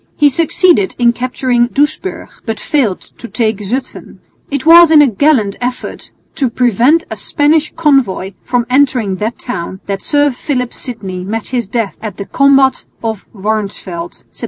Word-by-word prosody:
He 295 Hz, -1 st, +4 dB
succeeded 325 Hz, -, +2 dB
in 240 Hz, -1 st, +3 dB
capturing 245 Hz, 0 st, 0 dB
Doesburg, 295 Hz, +8 st, -1 dB, 0.2 s
but 225 Hz, -2 st, -4 dB
failed 250 Hz, -, 0 dB, 0.2 s
to 235 Hz, -, -7 dB
take 220 Hz, -3 st, -1 dB
Zutphen. 240 Hz, +6 st, -5 dB, 0.3 s
It 280 Hz, -1 st, -3 dB
was 335 Hz, 0 st, +8 dB
in 315 Hz, -1 st, +6 dB
a 295 Hz, -, +7 dB
gallant 230 Hz, -3 st, +1 dB
effort 245 Hz, +1 st, -5 dB, 0.3 s
to 270 Hz, -5 st, +1 dB
prevent 245 Hz, -, +2 dB
a -, -, -3 dB
Spanish 305 Hz, 0 st, +1 dB
convoy 270 Hz, -, +1 dB
from 245 Hz, -1 st, -1 dB
entering 250 Hz, -7 st, +1 dB
that 220 Hz, +4 st, -3 dB
town 190 Hz, -5 st, -6 dB
that 195 Hz, -1 st, -3 dB
Sir 290 Hz, -1 st, +2 dB
Philip 250 Hz, -1 st, -3 dB
Sidney 195 Hz, -8 st, -6 dB
met 215 Hz, +3 st, -4 dB
his 245 Hz, -5 st, -2 dB
death 225 Hz, -2 st, -2 dB
at 215 Hz, -4 st, -6 dB
the 200 Hz, -, -5 dB
combat 275 Hz, 0 st, +3 dB, 0.2 s
of 220 Hz, -3 st, -4 dB
Warnsfeld 195 Hz, -4 st, -4 dB
(Sept. -, -, -19 dB
245 Hz, 160 wpm, -14 LUFS, 210-285 Hz, 0.3 s, was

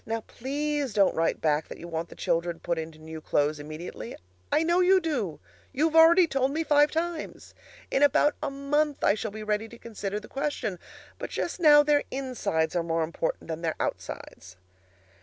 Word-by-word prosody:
Now 225 Hz, 0 st, -3 dB
please 285 Hz, +1 st, -3 dB
don't 200 Hz, -2 st, +4 dB
write 165 Hz, +1 st, 0 dB
back 155 Hz, 0 st, +1 dB
that -, -, -9 dB
you 170 Hz, -, -9 dB
want 165 Hz, 0 st, -4 dB
the -, -, -12 dB
children 170 Hz, 0 st, -1 dB
put 170 Hz, 0 st, -2 dB
into 160 Hz, 0 st, -7 dB
new 160 Hz, 0 st, -9 dB
clothes 150 Hz, 0 st, 0 dB
immediately. 155 Hz, -5 st, -7 dB, 0.4 s
I 315 Hz, -, +3 dB
know 345 Hz, +2 st, +2 dB
you 375 Hz, +1 st, +5 dB
do; 255 Hz, -, -2 dB, 0.3 s
you've 315 Hz, +3 st, +1 dB
already 335 Hz, +2 st, +8 dB
told 270 Hz, -4 st, 0 dB
me 320 Hz, +3 st, -1 dB
five 295 Hz, -1 st, +4 dB
times. 330 Hz, 0 st, -4 dB, 0.4 s
In 270 Hz, -, +1 dB
about 290 Hz, +1 st, +4 dB
a -, -, -1 dB
month 285 Hz, +2 st, -1 dB
I -, -, +5 dB
shall 220 Hz, +1 st, -3 dB
be 215 Hz, +1 st, -8 dB
ready 210 Hz, +1 st, -1 dB
to 235 Hz, -, -12 dB
consider 210 Hz, -3 st, -5 dB
the 210 Hz, -, -13 dB
question, 270 Hz, -, -3 dB, 0.4 s
but -, -, -5 dB
just 345 Hz, -, -3 dB
now 295 Hz, -3 st, +7 dB
their 295 Hz, -1 st, +3 dB
insides 235 Hz, -12 st, -2 dB
are 175 Hz, -, +2 dB
more 165 Hz, -1 st, 0 dB
important 165 Hz, 0 st, -3 dB
than 160 Hz, 0 st, -4 dB
their 165 Hz, -2 st, -1 dB
outsides. 90 Hz, 0 st, -5 dB
225 Hz, 190 wpm, -27 LUFS, -, 0.4 s, already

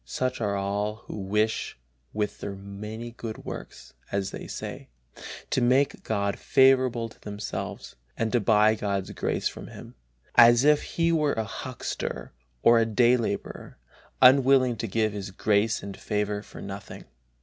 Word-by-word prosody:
Such 130 Hz, -, -3 dB
are 100 Hz, -2 st, 0 dB
all 100 Hz, +2 st, -2 dB
who -, -, -7 dB
wish 105 Hz, -, -1 dB, 0.3 s
with 105 Hz, -1 st, -3 dB
their 100 Hz, -, -5 dB
many 105 Hz, +4 st, -7 dB
good 115 Hz, -2 st, -8 dB
works, -, -, -8 dB, 0.2 s
as 100 Hz, -1 st, -1 dB
they -, -, -7 dB
say, -, -, -7 dB, 0.6 s
to 130 Hz, -, +2 dB
make 130 Hz, +3 st, +2 dB
God 100 Hz, -2 st, -1 dB
favorable 130 Hz, -3 st, +3 dB
to 115 Hz, -, -18 dB
themselves, 105 Hz, 0 st, -6 dB, 0.2 s
and 115 Hz, -1 st, -1 dB
to 120 Hz, -, +3 dB
buy 110 Hz, 0 st, +4 dB
God's 100 Hz, -3 st, -2 dB
grace -, -, -1 dB
from -, -, -8 dB
Him, -, -, -11 dB, 0.4 s
as 120 Hz, +1 st, +7 dB
if 150 Hz, 0 st, +5 dB
He 165 Hz, 0 st, 0 dB
were 150 Hz, -3 st, +2 dB
a 110 Hz, -, -1 dB
huckster 120 Hz, +3 st, -5 dB, 0.3 s
or 115 Hz, 0 st, +6 dB
a 115 Hz, -, +3 dB
day 120 Hz, +2 st, +4 dB
laborer, 115 Hz, -3 st, -4 dB, 0.5 s
unwilling 130 Hz, -1 st, +6 dB
to 115 Hz, -, -3 dB
give 110 Hz, +1 st, 0 dB
His 100 Hz, -2 st, -5 dB
grace 105 Hz, +3 st, +1 dB
and 100 Hz, -1 st, -6 dB
favor 105 Hz, -1 st, -2 dB
for -, -, -11 dB
nothing. 100 Hz, 0 st, -8 dB
110 Hz, 155 wpm, -26 LUFS, 100-120 Hz, 0.6 s, as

